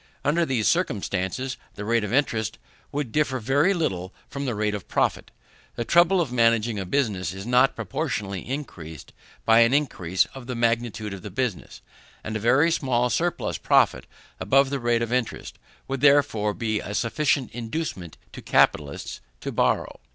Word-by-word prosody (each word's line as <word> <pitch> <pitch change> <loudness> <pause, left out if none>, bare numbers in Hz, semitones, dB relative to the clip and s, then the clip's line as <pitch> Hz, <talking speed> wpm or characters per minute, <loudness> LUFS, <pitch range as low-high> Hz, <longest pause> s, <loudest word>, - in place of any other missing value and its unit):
Under 165 +4 +2
these 120 -5 +1
circumstances 130 - -1 0.2
the 105 - -6
rate 115 0 +2
of 105 - -3
interest 115 -5 0 0.3
would 140 -5 -3
differ 140 -2 +1
very 135 - +2
little 95 - -1 0.2
from 140 0 -5
the 120 -4 -2
rate 105 0 0
of 105 -3 -6
profit. - - 0 0.5
The 120 - -3
trouble 175 - +4
of 155 -8 -1
managing 115 -2 +2
a 95 - -4
business 95 - -1
is 95 +1 -7
not 125 +2 +3
proportionally 105 - -3
increased 85 - -7 0.3
by 115 0 +6
an 115 +3 +5
increase 95 - +1
of 130 -2 -10
the 125 - -3
magnitude 115 -3 -1
of 95 - -8
the 105 - -7
business; 110 -1 -4 0.4
and 110 - -5
a - - -1
very 130 +9 +4
small 125 -5 +1
surplus 175 +6 -1
profit - - +3 0.3
above 135 0 +3
the 140 - -1
rate 120 -1 +1
of 115 +1 -3
interest, 125 -3 -3 0.3
would 135 -1 -3
therefore 140 -8 +3
be 110 -2 -1
a 100 - -5
sufficient 135 +2 0
inducement 115 - -5 0.2
to - - -8
capitalists 70 -1 +1 0.2
to - - -4
borrow. - - 0
120 Hz, 165 wpm, -25 LUFS, 105-140 Hz, 0.5 s, by